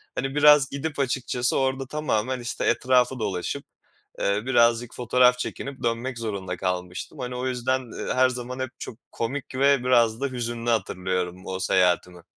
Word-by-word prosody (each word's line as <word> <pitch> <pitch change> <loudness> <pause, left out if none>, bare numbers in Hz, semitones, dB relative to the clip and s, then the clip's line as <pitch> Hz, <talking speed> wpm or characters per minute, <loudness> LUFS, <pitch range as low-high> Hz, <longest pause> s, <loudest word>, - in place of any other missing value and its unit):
hani, 135 +2 -3
biraz 150 -2 +6
gidip 145 +1 -4
açıkçası 125 -2 0
orada 135 0 0
tamamen, 130 -4 -1
işte, 120 0 -3
etrafı 125 +1 +2
dolaşıp, 95 -5 -3 0.5
eee, 100 +1 0
birazcık 120 -2 +3
fotoğraf 125 +1 +3
çekinip 135 +2 -5
dönmek 120 +1 -2
zorunda 100 -5 -4
kalmıştım. 90 - -4
Hani, 125 -1 -4
o 125 +1 -3
yüzden, 130 0 -2
eee, - - -1
her 130 0 +5
zaman 125 0 -5
hep 130 -1 -2
çok 115 - -8
komik 130 +3 -4
ve 140 -1 +3
biraz 120 -2 +3
da 140 - +1
hüzünlü 120 -2 -3
hatırlıyorum 90 -3 -2
o 95 0 -3
seyahatimi. 90 -2 +1
125 Hz, 155 wpm, -25 LUFS, 110-130 Hz, 0.5 s, biraz